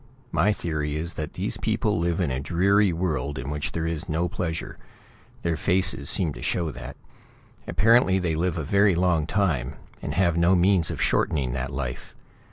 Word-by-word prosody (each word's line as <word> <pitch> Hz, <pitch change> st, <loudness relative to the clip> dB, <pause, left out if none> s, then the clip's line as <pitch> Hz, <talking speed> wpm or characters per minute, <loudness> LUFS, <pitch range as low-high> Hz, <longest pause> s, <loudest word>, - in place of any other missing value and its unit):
My 85 Hz, +7 st, +3 dB
theory 75 Hz, -6 st, -2 dB
is 85 Hz, +2 st, -2 dB
that 75 Hz, -3 st, -5 dB
these -, -, -2 dB
people -, -, 0 dB
live 85 Hz, +1 st, 0 dB
in 85 Hz, -7 st, 0 dB
a 65 Hz, -, -2 dB
dreary 95 Hz, +7 st, +2 dB
world 75 Hz, -5 st, -2 dB
in 65 Hz, +2 st, -4 dB
which 75 Hz, 0 st, -3 dB
there 80 Hz, 0 st, -2 dB
is 80 Hz, +1 st, -3 dB
no 80 Hz, +3 st, 0 dB
pleasure. 85 Hz, -2 st, -4 dB, 0.6 s
Their 85 Hz, -1 st, 0 dB
faces 90 Hz, -4 st, +1 dB
seem 85 Hz, -7 st, +1 dB
to -, -, -10 dB
show 85 Hz, -3 st, -1 dB
that. -, -, -9 dB, 0.7 s
Apparently 110 Hz, -3 st, +4 dB
they 90 Hz, -3 st, -1 dB
live 85 Hz, +2 st, -1 dB
a 80 Hz, -, -2 dB
very 100 Hz, +4 st, +3 dB
long 85 Hz, -3 st, +1 dB
time, 80 Hz, -11 st, 0 dB, 0.3 s
and 75 Hz, -, -4 dB
have 85 Hz, -2 st, +2 dB
no 85 Hz, +2 st, +4 dB
means 90 Hz, -2 st, +3 dB
of -, -, -5 dB
shortening 65 Hz, -5 st, +1 dB
that 65 Hz, 0 st, -3 dB
life. 60 Hz, -3 st, -5 dB
85 Hz, 180 wpm, -25 LUFS, 75-90 Hz, 0.7 s, Apparently